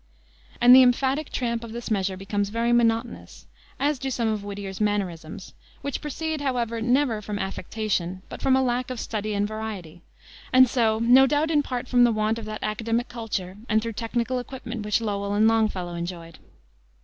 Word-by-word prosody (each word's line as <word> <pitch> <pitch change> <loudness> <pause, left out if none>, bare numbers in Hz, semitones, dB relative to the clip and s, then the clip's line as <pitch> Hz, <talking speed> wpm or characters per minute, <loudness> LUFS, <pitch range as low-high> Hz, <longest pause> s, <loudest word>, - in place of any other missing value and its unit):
and 245 +1 +8
the 260 - +9
emphatic 265 +4 +2
tramp 235 -2 -2
of 225 -1 -8
this 235 -1 -6
measure 190 -2 0
becomes 200 +1 -2
very 230 +2 0
monotonous, 230 0 0 0.3
as 285 -1 +1
do 270 +1 -3
some 235 -3 -1
of 215 -2 -1
Whittier's 200 -1 -6
mannerisms; 185 -5 -2 0.3
which 280 - -3
proceed, 315 +1 -3
however, 240 -4 -1
never 245 -2 +2
from 210 0 -4
affectation, 190 -2 -3
but - - -9
from 265 -1 +3
a 265 - +3
lack 250 0 -1
of 255 -2 -5
study 215 -1 -3
and 205 0 +1
variety, 205 -6 -6 0.5
and 255 0 +7
so, 230 -3 +2
no 245 +4 +6
doubt, 295 +4 +1
in 300 -2 +4
part 255 -3 -4
from 245 -1 +4
the 240 - +5
want 215 +1 0
of 225 - -8
that 215 0 -6
academic 230 +3 -1
culture 200 -5 -4
and 220 -1 +2
thorough 230 - -3
technical 235 +3 -2
equipment 245 -3 -6
which 210 +2 +1
Lowell 200 -2 -2
and 215 +1 +4
Longfellow 215 -6 +1
enjoyed. 170 -1 -6
225 Hz, 185 wpm, -25 LUFS, 205-245 Hz, 0.5 s, the